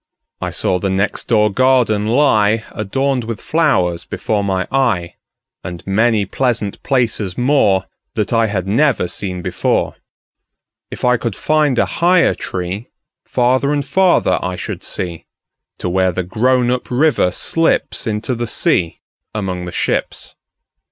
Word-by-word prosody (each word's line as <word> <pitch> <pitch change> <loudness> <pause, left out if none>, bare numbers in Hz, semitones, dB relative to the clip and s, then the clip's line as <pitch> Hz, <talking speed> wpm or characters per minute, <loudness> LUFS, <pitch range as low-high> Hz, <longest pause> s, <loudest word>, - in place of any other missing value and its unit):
I - - -2
saw 90 - 0
the 95 - -1
next 95 +2 -1
door 105 -2 +3
garden 120 -3 +2
lie, 110 -4 +3
Adorned 130 +5 -1
with 115 -2 -5
flowers, 95 - +1
before 105 -2 -2
my 95 -2 -1
eye, 115 -11 +1 0.5
And 85 -1 -7
many 110 +1 +2
pleasant 115 -1 -2
places 115 -8 0
moreThat 110 -4 0
I 115 -1 +3
had 100 -3 -2
never 120 -1 +2
seen 90 -1 -5
before. - - -1 0.9
If - - -5
I 125 0 +4
could 115 -3 -3
find 150 -4 +1
a - - +3 0.2
higher 175 0 +4
treeFarther 120 +7 -2
and 145 -2 0
farther 185 +5 +3
I 90 0 -3
should - - -6
see, 85 -3 -4 0.5
To - - -4
where 95 +1 +2
the 95 +2 -2
grown 120 +6 +1
up 125 0 -2
river 140 -4 +2
slipsInto 115 - 0
the 120 0 -3
sea 85 -5 0 0.3
among 95 -4 -3
the 90 - -6
ships. - - -2
110 Hz, 135 wpm, -17 LUFS, 95-130 Hz, 0.9 s, I